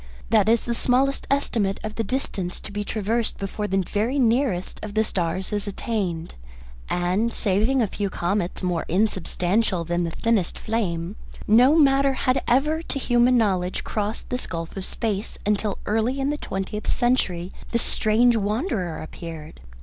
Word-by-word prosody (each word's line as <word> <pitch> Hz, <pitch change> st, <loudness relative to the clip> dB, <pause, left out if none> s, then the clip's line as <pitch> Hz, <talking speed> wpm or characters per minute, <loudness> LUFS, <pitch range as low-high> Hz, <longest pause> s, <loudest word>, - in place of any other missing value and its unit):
That 215 Hz, -2 st, +4 dB
is 230 Hz, 0 st, +3 dB
the 235 Hz, -, -1 dB
smallest 260 Hz, +3 st, +1 dB
estimate 225 Hz, -8 st, +1 dB
of 215 Hz, 0 st, -4 dB
the 225 Hz, -, -2 dB
distance 195 Hz, -6 st, -3 dB
to -, -, -8 dB
be 205 Hz, 0 st, -2 dB
traversed 220 Hz, +2 st, -1 dB
before 200 Hz, +1 st, -3 dB
the 195 Hz, -1 st, +1 dB
very 225 Hz, +7 st, 0 dB
nearest 235 Hz, -6 st, +1 dB
of 210 Hz, -1 st, -7 dB
the 220 Hz, -, +4 dB
stars 185 Hz, 0 st, -2 dB
is 205 Hz, 0 st, -1 dB
attained. 195 Hz, -6 st, -3 dB, 0.6 s
And, 185 Hz, +6 st, +1 dB
saving 225 Hz, +6 st, +2 dB
a -, -, +1 dB
few 200 Hz, +1 st, -2 dB
comets 180 Hz, +1 st, -1 dB
more 175 Hz, -2 st, 0 dB
unsubstantial 190 Hz, 0 st, +1 dB
than 175 Hz, +1 st, -1 dB
the 170 Hz, -, -1 dB
thinnest 210 Hz, +1 st, 0 dB
flame, 195 Hz, -4 st, -2 dB, 0.3 s
no 245 Hz, +7 st, +6 dB
matter 275 Hz, -2 st, +4 dB
had 260 Hz, 0 st, +1 dB
ever 300 Hz, +6 st, +2 dB
to 330 Hz, -, -4 dB
human 245 Hz, -1 st, +3 dB
knowledge 185 Hz, -5 st, +1 dB
crossed 210 Hz, +1 st, -3 dB
this 250 Hz, +1 st, -2 dB
gulf 165 Hz, -1 st, -5 dB
of 190 Hz, -1 st, -3 dB
space 215 Hz, -2 st, -3 dB
until 210 Hz, -1 st, 0 dB
early 225 Hz, +5 st, 0 dB
in 275 Hz, +1 st, +1 dB
the -, -, -1 dB
twentieth 195 Hz, -2 st, -4 dB
century 195 Hz, -8 st, +1 dB, 0.2 s
this 235 Hz, -, +1 dB
strange 230 Hz, +3 st, +3 dB
wanderer 205 Hz, -, -1 dB
appeared. 160 Hz, -, -9 dB
210 Hz, 160 wpm, -24 LUFS, 185-240 Hz, 0.6 s, no